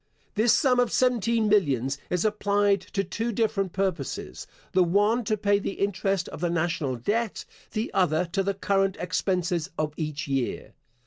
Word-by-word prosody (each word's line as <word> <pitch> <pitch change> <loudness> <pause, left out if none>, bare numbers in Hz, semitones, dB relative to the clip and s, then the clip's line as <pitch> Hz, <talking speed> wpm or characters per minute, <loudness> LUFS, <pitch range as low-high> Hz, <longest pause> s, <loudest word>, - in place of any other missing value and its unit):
This 220 +2 +3
sum 255 -2 +3
of 245 -2 +2
seventeen 235 -3 +2
millions 140 - +2
is 180 +2 0
applied 205 -2 +2
to 195 - +1
two 230 +3 -3
different 210 -4 0
purposes; 165 - -3 0.2
the 185 - +4
one 205 +7 +2
to 215 0 0
pay 200 0 +2
the 200 - -3
interest 195 -1 -1
of - - -9
the 175 - +1
National 165 -5 -1
Debt, 210 - -2 0.3
the 220 +2 -2
other 180 -2 +2
to 195 +2 +1
the 195 0 -1
current 195 -1 +1
expenses 180 -1 -1
of 155 -1 -1
each 150 -3 -3
year. 135 -3 -2
195 Hz, 165 wpm, -26 LUFS, 170-210 Hz, 0.3 s, the